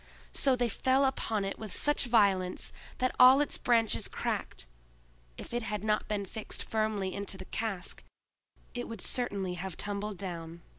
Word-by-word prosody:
So 270 Hz, -2 st, +2 dB
they 245 Hz, -1 st, +1 dB
fell 260 Hz, +4 st, +2 dB
upon 225 Hz, -6 st, 0 dB
it 195 Hz, -, -4 dB
with 215 Hz, -3 st, -6 dB
such 295 Hz, +7 st, +2 dB
violence 195 Hz, -6 st, +2 dB, 0.2 s
that 255 Hz, 0 st, 0 dB
all 255 Hz, +2 st, +9 dB
its 290 Hz, -, 0 dB
branches 230 Hz, -3 st, +2 dB
cracked; -, -, -3 dB, 0.7 s
if -, -, -8 dB
it 240 Hz, -, 0 dB
had 210 Hz, -2 st, -3 dB
not 215 Hz, 0 st, +1 dB
been 205 Hz, -2 st, -1 dB
fixed 215 Hz, +3 st, -4 dB
firmly 215 Hz, -4 st, -1 dB
in 200 Hz, -, -4 dB
the 195 Hz, -, -3 dB
cask, 200 Hz, -5 st, -4 dB, 0.7 s
it 245 Hz, 0 st, -4 dB
would 230 Hz, -, -7 dB
certainly 200 Hz, -7 st, -1 dB
have 180 Hz, 0 st, -5 dB
tumbled 205 Hz, 0 st, -3 dB
down. 170 Hz, -3 st, -6 dB
210 Hz, 160 wpm, -31 LUFS, 195-240 Hz, 0.7 s, all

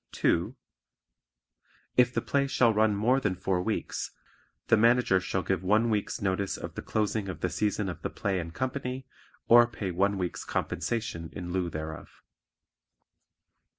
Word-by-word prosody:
(2) -, -, +1 dB, 1.4 s
If 125 Hz, -1 st, +5 dB
the -, -, -1 dB
play 140 Hz, -1 st, +1 dB
shall 120 Hz, -4 st, +3 dB
run 110 Hz, 0 st, +3 dB
more 120 Hz, +6 st, +3 dB
than 105 Hz, -8 st, 0 dB
four 90 Hz, 0 st, 0 dB
weeks, 110 Hz, +3 st, -2 dB, 0.6 s
the -, -, +5 dB
Manager 115 Hz, -3 st, +4 dB
shall 95 Hz, 0 st, -2 dB
give 95 Hz, 0 st, 0 dB
one 110 Hz, +5 st, +3 dB
week's 105 Hz, -2 st, -1 dB
notice 95 Hz, 0 st, 0 dB
of -, -, -7 dB
the -, -, -5 dB
closing 105 Hz, -2 st, -1 dB
of 85 Hz, -4 st, -6 dB
the 90 Hz, -, 0 dB
season 105 Hz, +3 st, 0 dB
of 85 Hz, -3 st, -5 dB
the -, -, -2 dB
play 95 Hz, -2 st, -1 dB
and 85 Hz, -1 st, -5 dB
company, 130 Hz, +3 st, -3 dB, 0.4 s
or 120 Hz, 0 st, +8 dB
pay 105 Hz, -5 st, -4 dB
one 100 Hz, +3 st, +1 dB
week's 90 Hz, -2 st, -3 dB
compensation 85 Hz, -2 st, -3 dB
in 90 Hz, -3 st, -5 dB
lieu 90 Hz, -2 st, 0 dB
thereof. 80 Hz, -1 st, -7 dB
100 Hz, 155 wpm, -29 LUFS, 90-115 Hz, 1.4 s, or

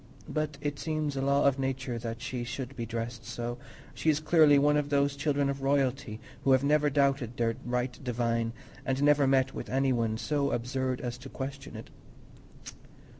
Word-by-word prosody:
But 155 Hz, -2 st, -2 dB
it 145 Hz, -1 st, -3 dB
seems 155 Hz, -2 st, -2 dB
a 135 Hz, -, -1 dB
law 140 Hz, +1 st, +3 dB
of 140 Hz, -1 st, +3 dB
nature 130 Hz, -2 st, -2 dB
that 115 Hz, +1 st, -5 dB
she 125 Hz, -1 st, -3 dB
should 130 Hz, +1 st, -5 dB
be 115 Hz, -2 st, -4 dB
dressed 115 Hz, +1 st, -4 dB
so: 120 Hz, +1 st, -5 dB, 0.3 s
she 160 Hz, -, 0 dB
is 150 Hz, -1 st, +3 dB
clearly 155 Hz, -2 st, +5 dB
one 145 Hz, +1 st, +4 dB
of 145 Hz, -1 st, 0 dB
those 140 Hz, 0 st, +2 dB
children 140 Hz, 0 st, +1 dB
of 140 Hz, 0 st, -2 dB
royalty 135 Hz, -4 st, 0 dB, 0.2 s
who 135 Hz, -, +5 dB
have 130 Hz, +1 st, +4 dB
never 150 Hz, +1 st, +3 dB
doubted 140 Hz, -4 st, +1 dB
their 115 Hz, -1 st, +1 dB
right 125 Hz, +2 st, -2 dB
divine 115 Hz, -2 st, 0 dB, 0.3 s
and 135 Hz, +1 st, 0 dB
never 145 Hz, -1 st, +5 dB
met 135 Hz, 0 st, +3 dB
with -, -, -6 dB
any 135 Hz, 0 st, +2 dB
one 115 Hz, -2 st, 0 dB
so 140 Hz, +5 st, 0 dB
absurd 130 Hz, +1 st, -1 dB
as 120 Hz, 0 st, -4 dB
to 135 Hz, +1 st, -9 dB
question 135 Hz, +1 st, -6 dB
it. -, -, -9 dB
135 Hz, 185 wpm, -29 LUFS, 120-140 Hz, 0.3 s, clearly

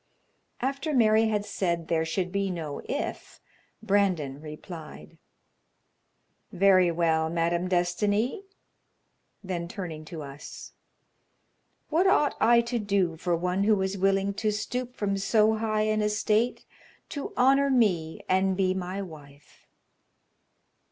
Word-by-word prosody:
After 275 Hz, +4 st, -1 dB
Mary 220 Hz, -2 st, +4 dB
had 210 Hz, -2 st, -1 dB
said 170 Hz, -5 st, -2 dB
there 160 Hz, -1 st, +1 dB
should 180 Hz, +2 st, -2 dB
be 200 Hz, 0 st, -1 dB
no 160 Hz, -5 st, -5 dB
"if," -, -, -5 dB, 0.4 s
Brandon 185 Hz, -10 st, +1 dB
replied: 155 Hz, -, -10 dB, 1.3 s
"Very 185 Hz, -1 st, +4 dB
well, 160 Hz, -1 st, +1 dB
Madame 170 Hz, +2 st, 0 dB
Destiny." 205 Hz, -, 0 dB, 1.0 s
Then 175 Hz, -3 st, -4 dB
turning 170 Hz, -5 st, -6 dB
to 160 Hz, -1 st, -7 dB
us: 140 Hz, +1 st, -10 dB, 1.2 s
"What 340 Hz, +5 st, +3 dB
ought 300 Hz, -6 st, +3 dB
I 235 Hz, 0 st, +6 dB
to 235 Hz, 0 st, -2 dB
do 200 Hz, -5 st, 0 dB
for 170 Hz, +2 st, -1 dB
one 180 Hz, +3 st, 0 dB
who 210 Hz, -2 st, +3 dB
is 190 Hz, +1 st, -2 dB
willing 195 Hz, +1 st, +1 dB
to 215 Hz, -, +2 dB
stoop 245 Hz, +4 st, -3 dB
from 200 Hz, -3 st, -1 dB
so 215 Hz, +2 st, +3 dB
high 215 Hz, -1 st, 0 dB
an 215 Hz, 0 st, +1 dB
estate 210 Hz, +3 st, 0 dB, 0.4 s
to 285 Hz, -, -5 dB
honor 275 Hz, +2 st, +4 dB
me 185 Hz, -11 st, +1 dB
and 190 Hz, 0 st, +2 dB
be 185 Hz, -1 st, +2 dB
my 185 Hz, +1 st, -4 dB
wife?" 145 Hz, -5 st, -14 dB
195 Hz, 125 wpm, -27 LUFS, 170-215 Hz, 1.3 s, I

